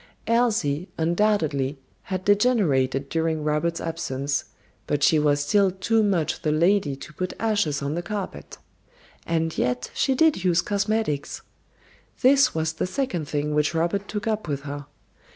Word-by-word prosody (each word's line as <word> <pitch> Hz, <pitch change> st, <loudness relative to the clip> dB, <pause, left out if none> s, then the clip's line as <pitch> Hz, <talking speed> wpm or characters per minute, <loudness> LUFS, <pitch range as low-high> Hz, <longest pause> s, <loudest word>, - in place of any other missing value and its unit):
Elsie, 215 Hz, -10 st, +1 dB
undoubtedly, 160 Hz, -6 st, +1 dB, 0.3 s
had 185 Hz, -1 st, -4 dB
degenerated 180 Hz, -, +2 dB
during 160 Hz, 0 st, -1 dB
Robert's 155 Hz, +3 st, 0 dB
absence, 140 Hz, -4 st, -2 dB, 0.4 s
but 145 Hz, -1 st, 0 dB
she 155 Hz, -, +5 dB
was 145 Hz, -1 st, +2 dB
still 195 Hz, +7 st, +3 dB
too 195 Hz, +5 st, +1 dB
much 190 Hz, -7 st, 0 dB
the 155 Hz, -, 0 dB
lady 165 Hz, -2 st, +2 dB
to 140 Hz, -, -11 dB
put 185 Hz, +4 st, -3 dB
ashes 205 Hz, -10 st, 0 dB
on 140 Hz, +1 st, -2 dB
the 170 Hz, -, -2 dB
carpet. 200 Hz, +1 st, -6 dB, 0.7 s
And 165 Hz, -1 st, 0 dB
yet 125 Hz, 0 st, -1 dB
she 265 Hz, -, +1 dB
did 315 Hz, -, +3 dB
use 175 Hz, -2 st, +3 dB
cosmetics. 205 Hz, -7 st, -1 dB, 0.8 s
This 270 Hz, -2 st, +5 dB
was 160 Hz, 0 st, 0 dB
the 160 Hz, -, -2 dB
second 185 Hz, -, -2 dB
thing 150 Hz, 0 st, -1 dB
which 150 Hz, +2 st, +1 dB
Robert 175 Hz, +5 st, 0 dB
took 210 Hz, -1 st, -4 dB
up 215 Hz, -4 st, -1 dB
with 140 Hz, -2 st, -2 dB
her. 145 Hz, -1 st, -7 dB
165 Hz, 150 wpm, -24 LUFS, 150-205 Hz, 0.8 s, she